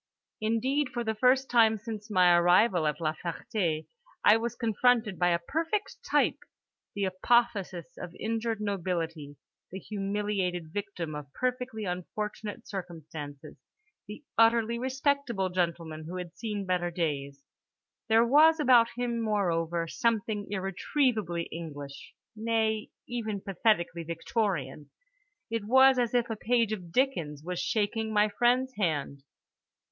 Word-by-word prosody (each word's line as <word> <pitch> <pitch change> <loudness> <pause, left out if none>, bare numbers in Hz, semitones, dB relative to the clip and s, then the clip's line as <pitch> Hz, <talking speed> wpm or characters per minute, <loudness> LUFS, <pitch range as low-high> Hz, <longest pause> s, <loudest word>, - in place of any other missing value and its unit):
Indeed 255 +6 0
for 240 - -2
the 220 -1 -1
first 255 +4 +3
time 225 -2 +4
since 215 0 -7
my 180 -3 +5
arrival 175 0 +4
at 150 0 -1
La 155 -2 0
Ferté 170 -1 -3 0.4
I 210 - +8
was 230 +1 -2
confronted 230 -2 +1
by 175 0 +3
a 170 - +3
perfect 325 - -2
type: - - +2 0.6
the 200 - -1
apotheosis 200 +1 0
of 180 -1 -8
injured 225 0 -2
nobility, 170 -7 -3 0.4
the 190 - -5
humiliated 195 -4 -2
victim 195 -6 -4
of 150 -2 -7
perfectly 250 -3 -2
unfortunate 205 +3 -5
circumstances, 155 -6 -8 0.5
the 210 +8 -9 0.2
utterly 230 0 +4
respectable 260 -6 0
gentleman 165 -3 -2
who 175 +3 -6
had 180 -3 -6
seen 210 -3 -4
better 180 -1 0
days. 140 -5 -3 0.7
There 225 +1 +5
was 310 +6 +6
about 245 -5 +5
him, 240 -1 -2
moreover, 170 -6 0
something 220 0 -1
irretrievably 195 - 0
English, 145 -4 -8 0.2
nay 220 -1 0 0.2
even 220 -4 -3
pathetically 190 -3 0
Victorian—it 220 - -4
was 265 +3 +6
as 240 0 0
if 240 -1 +2
a 225 - -3
page 230 0 +1
of 180 -5 -7
Dickens 170 - 0
was 180 +1 -4
shaking 220 +1 -1
my 210 0 +3
friend's 245 +5 +2
hand. 145 -6 -1
210 Hz, 125 wpm, -29 LUFS, 175-235 Hz, 0.7 s, I